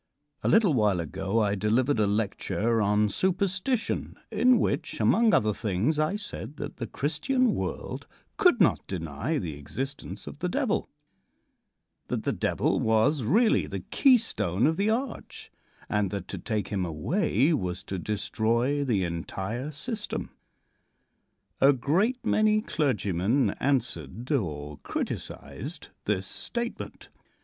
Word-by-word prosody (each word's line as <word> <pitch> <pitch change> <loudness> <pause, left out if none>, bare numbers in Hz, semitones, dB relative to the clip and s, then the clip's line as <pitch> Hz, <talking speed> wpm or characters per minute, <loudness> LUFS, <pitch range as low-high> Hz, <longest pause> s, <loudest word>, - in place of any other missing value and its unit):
A - - -1
little 210 -7 +5
while 105 -7 +2
ago 95 +6 -1
I 100 -2 +2
delivered 115 +6 +1
a 105 - +3
lecture 110 +2 0
on 105 +1 +3
"Superstition," 190 - 0 0.2
in 245 +3 +5
which, - - -1
among 230 -1 +4
other 105 - +3
things, 110 - 0
I 155 +6 +1
said 205 -7 -6
that 145 0 -6
the 115 - -4
Christian 225 - +1
world - - -4 0.3
could 360 - +4
not 175 - +3
deny 85 - -2
the 85 - -3
existence 135 - -6
of - - -9
the - - -1
Devil; - - 0 1.2
that - - -2
the - - 0
Devil - - 0
was 110 +6 +3
really 215 - +3
the - - -5
keystone 225 - +3
of 160 +2 +3
the 200 +4 +1
arch, 240 +2 -3 0.4
and 105 -2 +1
that 100 -2 -5
to - - -4
take 105 -4 -2
him 100 -3 -1
away 130 - +1
was 90 - -2
to 95 - -4
destroy 115 +7 0
the 110 -8 +1
entire 95 - -4
system. 210 - -4 1.3
A 140 +1 +6
great 190 - +1
many 215 0 +3
clergymen 115 - +1
answered 120 - -1
or 75 - -2
criticised - - -5 0.2
this 100 -2 0
statement. 235 - -4
125 Hz, 130 wpm, -27 LUFS, -, 1.3 s, A